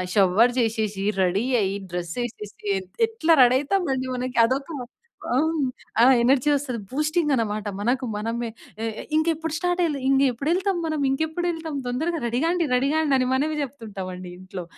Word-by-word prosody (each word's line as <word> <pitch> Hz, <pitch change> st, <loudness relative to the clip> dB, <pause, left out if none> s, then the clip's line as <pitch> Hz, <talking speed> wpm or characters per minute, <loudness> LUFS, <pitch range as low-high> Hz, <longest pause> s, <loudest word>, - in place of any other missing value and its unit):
Shower 205 Hz, +5 st, +4 dB
చేసేసి, 215 Hz, -4 st, -1 dB, 0.2 s
ready 190 Hz, +5 st, +1 dB, 0.2 s
అయ్యి, 195 Hz, 0 st, 0 dB, 0.2 s
డ్రెస్సేసేసి 210 Hz, +5 st, -5 dB, 0.2 s
ఎత్ 185 Hz, -1 st, -14 dB
ఎట్లా 340 Hz, -8 st, +2 dB
రెడీ 250 Hz, +1 st, +5 dB
అయితామండి 275 Hz, -6 st, 0 dB
మనకి 250 Hz, -1 st, -2 dB
అదొక 270 Hz, +5 st, -2 dB, 0.7 s
ఆహ్, 315 Hz, +5 st, +2 dB, 0.5 s
ఆ! -, -, +7 dB, 0.2 s
ఎనర్జీ 265 Hz, +3 st, +3 dB
వస్తది. 265 Hz, -4 st, -3 dB
బూస్టింగన్నమాట. 275 Hz, -, 0 dB
మనకు 250 Hz, +5 st, 0 dB
మనమే. 230 Hz, +2 st, -2 dB, 0.3 s
ఆహ్, 225 Hz, -, -1 dB, 0.2 s
ఇంకెప్పుడు 320 Hz, 0 st, 0 dB
స్టార్ట్ 355 Hz, +2 st, 0 dB
అయ్యే 300 Hz, -5 st, 0 dB
ఇంగేప్పుడెళ్తాం 285 Hz, -, +2 dB
మనం, 310 Hz, -2 st, -1 dB
ఇంకెప్పుడు 315 Hz, +5 st, -1 dB
ఎళ్తాం 325 Hz, -2 st, -5 dB
తొందరగా 320 Hz, +7 st, -1 dB
రెడీగాండి 325 Hz, +9 st, +1 dB
రెడీగాండి 285 Hz, +3 st, +2 dB
అని 255 Hz, -, +1 dB
మనమే 300 Hz, +4 st, +1 dB
చెప్తుంటామండి 195 Hz, -9 st, -6 dB
ఇంట్లో. 185 Hz, -1 st, -7 dB
260 Hz, 135 wpm, -24 LUFS, 225-315 Hz, 0.7 s, ఆ